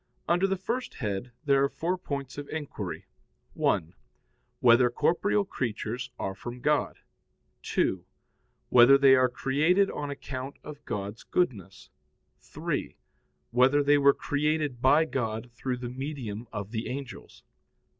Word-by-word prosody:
Under 175 +3 +3
the 195 0 -1
first 235 +7 -4
head 105 +3 -3
there 140 -1 +4
are 140 - +2
four 175 +5 -2
points 140 -6 -5
of 145 - -8
inquiry: 155 -2 -5 0.5
(1) 85 -4 0 0.7
Whether 125 0 +6
corporeal 200 +10 +1
creatures 120 - -4
are 95 - -3
from 120 +5 -8
God? 150 +3 +1 0.6
(2) 95 -2 0 0.7
Whether 125 +3 +8
they 135 -1 +7
were 130 -1 +4
created 155 +10 +2
on 145 - -4
account 135 -1 -6
of 150 -1 -10
God's 100 +2 -4
goodness? 100 - -2 0.5
(3) - - -4 0.5
Whether 130 +4 +4
they 145 +1 +4
were 140 0 +5
created 150 -3 -1
by 145 +5 +5
God 115 -4 -3
through 125 +2 -3
the 125 0 -5
medium 125 -5 -5
of 105 -1 -5
the 115 -1 -3
angels? 135 0 -8
135 Hz, 135 wpm, -28 LUFS, 120-150 Hz, 0.7 s, Whether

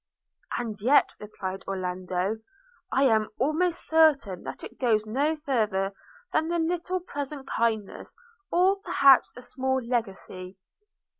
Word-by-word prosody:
'And 220 -4 -4
yet,' 260 +7 +4
replied 195 -2 -6
Orlando, 185 +2 -2 0.5
'I 270 - +3
am 220 -5 +3
almost 320 +7 0
certain 295 - +3
that - - -7
it - - -10
goes 220 -4 +2
no 280 +8 0
farther 215 -10 0 0.4
than 320 +2 +1
a 345 - +1
little 350 +2 -1
present 285 -4 -6
kindness, 220 -3 -2 0.4
or 370 +3 +4
perhaps 275 -10 +4
a 250 - -9
small 265 +1 -1
legacy.' 195 -6 -4
250 Hz, 125 wpm, -27 LUFS, 205-305 Hz, 0.5 s, yet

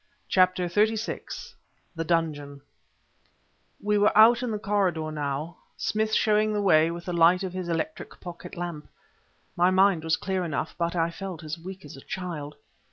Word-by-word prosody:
CHAPTER 185 -1 +3
XXXVI 215 +5 -1 0.4
THE 165 - -2
DUNGEON 150 -4 -1 1.2
We 210 0 +2
were 205 0 +3
out 230 +2 +7
in 250 - -2
the 215 - -1
corridor 190 -7 0
now, 150 +2 -3 0.2
Smith 220 0 0
showing 215 0 +3
the 210 - 0
way 160 -4 +5
with 170 0 -6
the 180 - -3
light 170 +2 +4
of 185 -1 -4
his 185 -2 -4
electric 305 - -4
pocket 175 -1 -9
lamp. 170 -4 -5 0.7
My 175 +1 +4
mind 185 -3 +3
was 160 0 +1
clear 190 -1 -2
enough, 160 -1 -3
but 170 +1 -1
I 165 0 +1
felt 185 -2 -7
as 155 +2 -5
weak 185 +1 -9
as 145 - -10
a 135 - -12
child. 165 -6 -6
175 Hz, 165 wpm, -26 LUFS, 160-200 Hz, 1.2 s, out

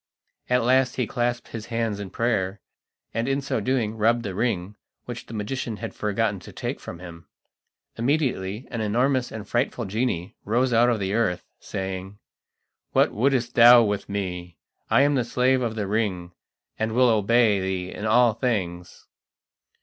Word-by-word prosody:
At 125 -1 +3
last 130 +1 +3
he 125 - 0
clasped 120 +2 -2
his 115 -1 -7
hands 115 -3 -2
in 100 -2 -6
prayer, 100 -3 -1 0.5
and 115 +2 -1
in 135 0 +1
so 140 -4 -2
doing 115 -2 0
rubbed 115 +2 +2
the 100 -4 -4
ring, 100 -2 -1 0.3
which 120 -1 -7
the - - -10
magician 110 +1 -3
had 115 0 -6
forgotten 105 -1 -1
to - - -12
take - - -4
from - - -8
him. 85 -2 -11 0.7
Immediately 120 -5 -1
an 115 -3 -3
enormous 125 +4 +1
and 110 -2 -7
frightful 120 0 -1
genie 95 -4 -2
rose 120 +4 +1
out 120 +2 +5
of 115 -3 +1
the 95 0 -2
earth, 95 -6 0
saying: 95 +1 -5 0.8
"What - - +4
wouldst 125 +1 +1
thou 120 0 +8
with 105 -2 -2
me? 90 -3 -4 0.3
I 140 - +5
am 145 +1 +3
the 130 -3 +2
Slave 125 +2 +2
of 115 -2 -2
the 105 -2 -2
Ring, 95 -4 -1 0.5
and 110 0 -1
will 125 +1 +4
obey 110 -1 +3
thee 95 -1 -3
in 105 - -4
all 120 +1 +5
things." 90 -8 -3
110 Hz, 165 wpm, -24 LUFS, 100-120 Hz, 0.8 s, thou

